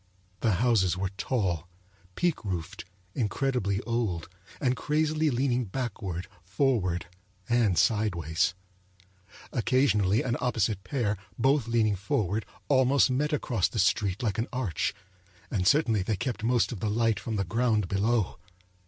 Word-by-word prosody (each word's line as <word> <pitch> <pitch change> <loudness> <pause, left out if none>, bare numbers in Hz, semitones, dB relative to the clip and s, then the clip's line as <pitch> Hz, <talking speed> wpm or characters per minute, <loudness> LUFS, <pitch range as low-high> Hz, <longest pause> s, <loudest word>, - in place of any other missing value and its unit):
The 110 -3 +2
houses 95 -4 +2
were 95 0 -1
tall, 95 - -1 0.5
peaked 175 -7 0
roofed, 90 -1 -4 0.3
incredibly 110 -3 0
old, 110 -8 -2 0.3
and 130 -2 +1
crazily 155 +3 +1
leaning 125 -1 +1
backward, 95 -6 -4
forward, 95 - 0 0.4
and 115 -7 +2
sidewise. 90 -7 +1 1.0
Occasionally 115 -5 +2
an 125 -1 -1
opposite 110 -5 0
pair, 105 -1 -1 0.2
both 135 0 +2
leaning 110 -3 +2
forward, 100 +2 -1 0.2
almost 130 0 +4
met 150 +4 0
across 125 - +1
the - - -6
street 95 +2 +1
like 110 -2 0
an 115 - 0
arch; 115 - -1 0.6
and 90 -4 0
certainly 115 -8 +3
they 105 +3 -1
kept 115 +2 -3
most 120 +1 +2
of 115 - -5
the 105 - -1
light 115 +1 +1
from 115 - -4
the 100 - +1
ground 110 +1 +1
below. 105 +2 0
110 Hz, 135 wpm, -28 LUFS, 95-125 Hz, 1.0 s, almost